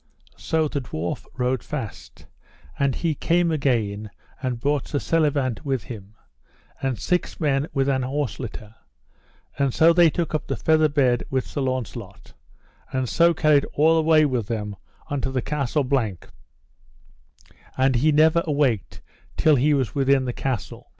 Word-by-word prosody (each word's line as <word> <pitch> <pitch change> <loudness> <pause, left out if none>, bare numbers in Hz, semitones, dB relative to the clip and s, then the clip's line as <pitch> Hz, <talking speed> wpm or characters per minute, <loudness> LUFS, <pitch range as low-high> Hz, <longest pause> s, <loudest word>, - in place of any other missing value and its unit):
So 160 -1 0
the 140 -1 -3
dwarf 85 -8 -5
rode 125 -1 0
fast, - - -7 0.5
and 140 -2 +1
he 165 -2 0
came 170 +2 +1
again 110 -8 -1 0.3
and 125 -3 -2
brought 145 +2 0
Sir 145 - -2
Selivant 145 -6 0
with 135 -5 -1
him, 110 -4 -10 0.7
and 135 -3 -1
six 180 - -1
men 145 -2 +1
with 135 -2 0
an 135 -1 +1
horse 130 -3 -2
litter; 110 -3 -7 0.9
and 140 -3 +1
so 165 +1 +6
they 170 -1 +6
took 170 +1 -3
up 155 - -2
the - - -1
feather 155 -1 +3
bed 130 -5 +2
with 130 -1 -1
Sir 145 - -4
Launcelot, 130 -3 -5 0.6
and 130 -1 -1
so 170 +5 +3
carried 150 -3 +3
all 160 +3 +4
away 160 -1 +4
with 125 -7 -1
them 105 -3 -3 0.4
unto 135 -2 -1
the 130 -3 -1
Castle 145 0 -1
Blank, 120 -9 -2 1.5
and 130 -1 +3
he 155 +6 +3
never 155 +3 +4
awaked 140 - 0 0.4
till 155 -2 +4
he 145 +3 +3
was 130 -6 -1
within 135 -1 +2
the 125 - -2
castle. 125 -8 -4
135 Hz, 155 wpm, -23 LUFS, 125-150 Hz, 1.5 s, so